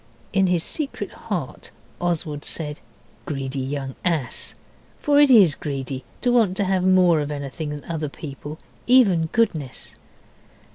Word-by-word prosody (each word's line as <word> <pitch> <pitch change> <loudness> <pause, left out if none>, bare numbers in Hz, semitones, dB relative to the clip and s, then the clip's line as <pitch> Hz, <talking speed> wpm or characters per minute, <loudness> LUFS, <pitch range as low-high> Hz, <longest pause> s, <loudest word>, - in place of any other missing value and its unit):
In 195 -1 +4
his 175 -2 +2
secret 300 -3 -3
heart - - -5 0.3
Oswald 160 -4 -2
said, 150 -2 -3 0.5
'Greedy 135 -2 -3
young 135 0 -3
ass.' 160 -8 -1 0.4
For 290 -1 +3
it 290 -1 +7
IS 200 - +7
greedy 135 -3 -4 0.2
to 245 - +2
want 220 -6 +3
to 205 - +2
have 190 -1 +1
more 185 -3 +5
of 145 - -3
anything 145 +1 -4
than 150 -1 -6
other 160 -3 -3
people, 145 +1 -8 0.3
even 200 -11 +5
goodness. 160 - -1
160 Hz, 140 wpm, -23 LUFS, 145-190 Hz, 0.5 s, it